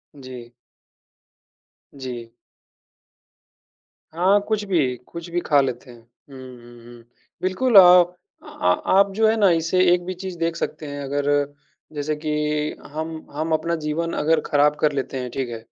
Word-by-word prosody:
जी। 130 -3 -11 1.4
जी। 125 -4 -7 1.9
हाँ, 190 +4 +4
कुछ 215 -1 -1
भी 155 -10 +1
कुछ 170 0 -9
भी 175 +1 -1
खा 145 -2 +4
लेते 130 -1 -4
हैं। 120 - -15
हुँ, 120 +4 -18
हुँ, 120 -2 -13
हुँ। 120 -1 -14 0.4
बिल्कुल 200 +7 0
अ, - - +13 0.2
प 175 +1 -14 0.3
अ - - -17
अ, 90 0 0 0.2
आप 200 0 +4
जो 220 +2 +2
हैं 220 - +3
ना, 205 -3 +4
इसे 165 +2 +1
एक 175 0 0
भी 185 - -4
चीज़ 185 0 -7
देख 165 0 -1
सकते 160 - -5
हैं, 145 0 -6
अगर 140 +1 -2 0.7
जैसे 150 +1 -2
कि 155 +1 -6 0.6
हम 160 +1 -4 0.2
हम 155 +2 -3
अपना 170 +2 0
जीवन 165 +2 -2
अगर 160 +2 +2
खराब 145 0 +2
कर 150 - +2
लेते 135 -1 -3
हैं, 125 -1 -4
ठीक 130 -1 -3
है? 115 - -5
150 Hz, 165 wpm, -22 LUFS, 130-175 Hz, 1.9 s, अ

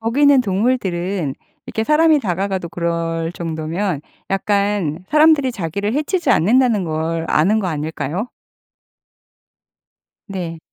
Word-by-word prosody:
거기는 275 +4 +4
동물들은 190 - -1 0.3
이렇게 220 - -2
사람이 305 +1 +4
다가가도 190 -3 -2
그럴 165 -1 -2
정도면 165 +1 -3 0.3
약간 195 -4 0
사람들이 300 -4 +4
자기를 200 +3 -3
해치지 340 +5 0
않는다는 225 +1 +3
걸 160 +1 -2
아는 195 +8 +3
거 190 - -2
아닐까요? 160 - -3 2.0
네. 175 -4 -5
190 Hz, 265 characters per minute, -19 LUFS, 165-230 Hz, 2.0 s, 거기는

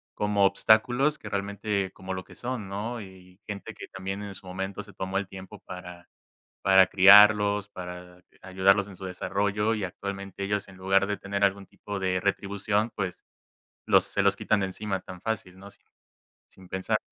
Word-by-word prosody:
como 105 -1 +2
obstáculos 120 +8 +3
que 105 - -8
realmente 100 -1 -2
como 95 0 -6
lo 95 - -5
que - - -16
son, 120 -4 -5
¿no?, 110 +5 -4
y 95 -1 -14
gente 100 -1 -7
que - - -9
también 95 +1 -5
en 100 - -7
su 95 - -13
momento 95 +2 -4
se 105 -1 -14
tomó 95 +1 -2
el 100 - -5
tiempo 95 +1 -10
para 90 -3 -10 0.5
para 95 -1 +6
criarlos, 105 +1 +7
para, 90 -1 -9
eh, - - -27
ayudarlos 95 +2 +3
en 100 - -11
su 95 - -7
desarrollo, 100 +4 0
y 105 -3 -3
actualmente 100 +1 -5
ellos, 100 0 -2
en 95 - -13
lugar 95 +1 +2
de 100 0 -2
tener 100 0 -4
algún 100 0 +2
tipo 100 +1 -7
de 95 -1 0
retribución, 100 +2 0
pues, 95 -2 -4 0.6
los - - +5
se - - -3
los - - +4
quitan 105 -2 +1
de 95 - 0
encima 95 0 -4
tan 90 -1 -11
fácil, 95 -5 -4
¿no?, 100 +1 -11
sin - - -23 0.6
sin 95 -1 -17
pensar. 95 +4 -1
100 Hz, 185 wpm, -27 LUFS, 95-105 Hz, 0.6 s, criarlos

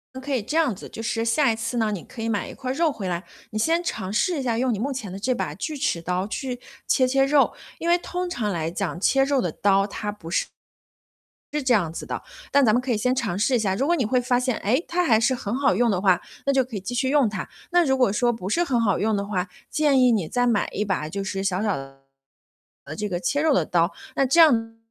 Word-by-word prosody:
嗯， 260 - -6
可 280 +1 -4
以 255 - +1
这 295 +10 -3
样 290 -10 +2
子， - - -10
就 225 - -7
是 225 0 -1
下 240 +3 +3
一 - - -1
次 230 +2 -3
呢， 220 -2 +1
你 195 -5 -4
可 230 - -10
以 225 - -1
买 205 -3 -1
一 - - -8
块 255 -1 -4
儿 - - -1
肉 320 +2 +2
回 205 -8 -5
来， 175 0 -2 0.3
你 215 - -3
先 330 +9 +2
尝 190 - -3
试 295 - +1
一 - - -1
下 235 -3 0
用 250 0 +1
你 205 - -3
目 270 +6 -1
前 250 -8 -5
的 190 - -6
这 250 +5 0
把 150 - -3
锯 300 - -5
齿 220 - -1
刀 180 +2 -1
去 250 +1 -4 0.3
切 255 - +3
切 270 +1 +3
肉。 280 0 +3 0.2
因 335 - -4
为 345 +1 +5
通 360 +1 -4
常 220 -11 -2
来 165 -2 -2
讲， 175 -1 -3
切 270 +7 +3
肉 275 0 +1
的 - - -1
刀， 195 -1 +2
它 210 0 -4
不 170 -5 -10
是 - - +1 1.1
是 300 -2 -1
这 255 - +3 0.6
样 - - -15
子 - - -14
的。 - - -18
但 280 -1 +5
咱 220 - +4
们 240 - +3
可 255 +1 -5
以 - - +1
先 250 +4 +1
尝 220 -8 -2
试 250 +4 +2
一 - - +2
下， 195 -4 0
如 265 +7 0
果 345 +2 +3
你 260 - 0
会 250 +4 +2
发 245 0 +1
现， 250 -2 0
诶， 255 - 0
它 355 +1 +1
还 225 -9 +4
是 260 +3 +2
很 220 -3 -4
好 275 -7 +2
用 235 +3 +2
的 185 -3 0
话， 190 -2 +3 0.3
那 275 - +3
就 265 -1 +3
可 240 -3 -8
以 195 - -3
继 220 +6 -5
续 260 +2 +1
用 280 -5 +4
它。 205 -4 -5 0.2
那 350 0 +4
如 265 -3 +2
果 250 -6 +3
说 240 +3 +2
不 210 -5 -5
是 335 - +2
很 250 -7 +1
好 205 -4 +2
用 215 0 +1
的 200 - -2
话， 190 -2 -2 0.2
建 295 -3 +3
议 250 -1 +5
你 195 -8 0
再 245 +5 +1
买 230 -4 +1
一 210 - -1
把 190 -6 -2
就 195 +3 -4
是 195 0 -3
小 195 0 0
小 210 -3 0
的 135 0 -10 0.9
这 210 0 -3
个 175 - -2
切 285 +11 0
肉 315 -2 +3
的 - - +2
刀， 170 +1 +2 0.2
那 275 - +2
这 275 +7 +4
样 225 -8 +4
235 Hz, 300 characters per minute, -24 LUFS, 200-270 Hz, 1.1 s, 为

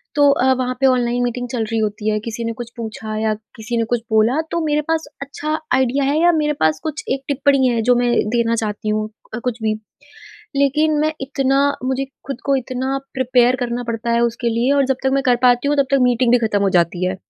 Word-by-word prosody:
तो 285 -1 +5
अ, 260 0 +3
वहाँ 255 0 -1
पे 270 - +4
ऑनलाइन 245 -1 +2
मीटिंग 245 0 -3
चल 235 -2 -2
रही 225 +1 -2
होती 210 0 -2
है, 215 - 0
किसी 230 +1 -5
ने 230 - -2
कुछ 235 -1 -6
पूछा 220 -1 -6
या 220 -1 +1 0.2
किसी 230 +2 -4
ने 230 - +1
कुछ 240 - +2
बोला 220 +7 +3
तो 340 - -1
मेरे 300 0 +1
पास 325 0 0 0.2
अच्छा 300 +3 -3 0.2
आइडिया 265 +2 +2
है 285 +3 +1
या 345 +1 +5
मेरे 300 -2 +1
पास 155 0 +2
कुछ 310 0 -4
एक 270 0 -4
टिप्पणी 275 -2 +2
है 235 -2 +1
जो 245 +2 +4
मैं 245 0 +1 0.2
देना 230 0 +2
चाहती 215 -1 -3
हूँ, 215 0 0 0.4
कुछ 245 -2 -3
भी। 215 -1 +1 0.8
लेकिन 300 +2 +2
मैं 310 +1 +1
इतना 270 0 +1 0.2
मुझे 265 +1 -1 0.2
खुद 275 -3 -5
को 275 -1 +2
इतना 260 +1 -2 0.2
प्रिपेयर 255 -1 +3
करना 245 0 -2
पड़ता 230 0 -3
है 235 0 +2
उसके 235 0 0
लिए 235 +4 +1
और 280 - +3
जब 265 -1 +1
तक 265 - +3
मैं 275 - +2
कर 245 -1 +4
पाती 245 +2 +4
हूँ 295 - +1
तब 280 -1 +3
तक 275 - +4
मीटिंग 245 -1 +2
भी 245 - +6
ख़त्म 205 -2 0
हो 195 - +2
जाती 175 +1 0
है। 185 - -2
245 Hz, 230 wpm, -19 LUFS, 230-275 Hz, 0.8 s, भी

